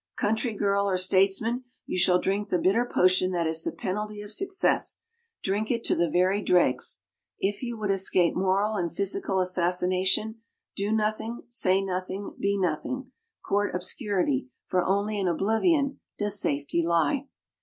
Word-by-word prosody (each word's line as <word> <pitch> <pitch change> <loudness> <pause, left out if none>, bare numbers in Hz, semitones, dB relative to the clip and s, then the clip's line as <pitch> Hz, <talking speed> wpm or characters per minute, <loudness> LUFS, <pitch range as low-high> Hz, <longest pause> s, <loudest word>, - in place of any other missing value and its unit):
country 220 +2 -1
girl 200 0 +1
or 185 - +1
statesman, 195 +6 +2 0.2
you - - -4
shall 180 0 +4
drink 200 +3 -1
the 180 - +2
bitter 230 +7 +1
potion 185 0 +3
that 170 -2 0
is 160 0 -1
the - - -2
penalty 210 +2 -4
of 205 - -4
success 385 - +1 0.4
drink 205 +3 -1
it 235 -2 -1
to - - +1
the 170 -1 +1
very 185 +5 +2
dregs. 175 -9 +2 0.4
If 200 +1 -2
you 240 -2 -4
would 210 -2 -1
escape 190 -2 +3
moral 195 +3 +1
and 170 -3 -2
physical 195 +1 -1
assassination, 185 +4 +1 0.3
do 200 +2 -2
nothing, 220 +2 -1
say 195 -5 +2
nothing, 185 +1 -4
be 200 0 0
nothing 225 - -2 0.4
court 205 -2 0
obscurity, 180 - -1 0.2
for 180 -1 0
only 205 +3 0
in 190 - 0
oblivion 270 - +1 0.2
does 205 -1 +1
safety 145 +4 0
lie." 170 - +1
195 Hz, 155 wpm, -27 LUFS, 185-215 Hz, 0.4 s, shall